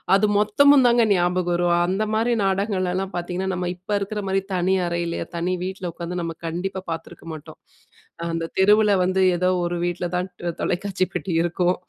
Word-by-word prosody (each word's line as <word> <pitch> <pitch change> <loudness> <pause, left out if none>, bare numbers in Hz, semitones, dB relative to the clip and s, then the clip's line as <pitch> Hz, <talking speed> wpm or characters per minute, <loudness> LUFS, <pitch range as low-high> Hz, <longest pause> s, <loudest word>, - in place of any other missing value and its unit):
அது 210 +2 +3
மொத்தமும் 265 +6 +5
தாங்க 235 -1 +4
ஞாபகம் 175 0 +1
வரும். 175 0 +2
அந்த 195 +4 0
மாரி 235 +2 +2
நாடகங்கள்லலாம் 190 -1 -1
பார்த்தீங்கன்னா, 180 +2 -2
நம்ம 180 0 -2
இப்ப 185 +3 -10
இருக்கிற 210 +1 -3
மாரி 195 0 +1
தனி 185 +2 +2
அறையில, 170 0 -2
தனி 180 +2 0
வீட்டில 185 -2 -4
உட்காந்து 175 +1 -4
நம்ம 165 -1 -4
கண்டிப்பா 185 +3 -3
பார்த்துருக்க 165 0 -7
மாட்டோம். 155 - -11 0.7
அந்த 165 0 -2
தெருவில 210 +2 +5
வந்து 185 +1 +1
ஏதோ 180 +1 +1 0.2
ஒரு 175 - -2
வீட்டில 175 0 -2
தான் 180 +1 -1 0.3
தொலைக்காட்சி 185 0 -1
பெட்டி 190 - -3
இருக்கும். 175 +1 +1
185 Hz, 160 wpm, -23 LUFS, 175-195 Hz, 0.7 s, மொத்தமும்